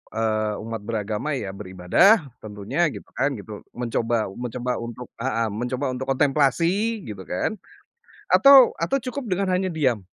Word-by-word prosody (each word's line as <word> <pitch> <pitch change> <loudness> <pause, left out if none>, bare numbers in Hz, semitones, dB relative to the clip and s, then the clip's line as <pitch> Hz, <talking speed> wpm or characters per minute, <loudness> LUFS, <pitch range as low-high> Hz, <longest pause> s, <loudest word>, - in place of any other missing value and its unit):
eee, 110 -1 0
umat 115 0 -5
beragama 105 +5 -3
ya 100 -7 -4
beribadah 100 - +3 0.2
tentunya 105 +9 -2
gitu - - -10
kan 135 +3 +1
gitu, 105 0 -9
mencoba 115 -2 -1
mencoba 125 +3 -4
untuk 120 +1 -7
heeh, 115 -2 -1
mencoba 125 +5 -3
untuk 130 +1 -5
kontemplasi 165 - +1
gitu 100 -3 -7
kan, 90 - -2 0.8
atau 275 -2 +8
atau 275 - 0
cukup 260 +1 -5
dengan 190 +1 0
hanya 185 +1 +1
diam. 130 - 0
125 Hz, 140 wpm, -23 LUFS, 110-165 Hz, 0.8 s, atau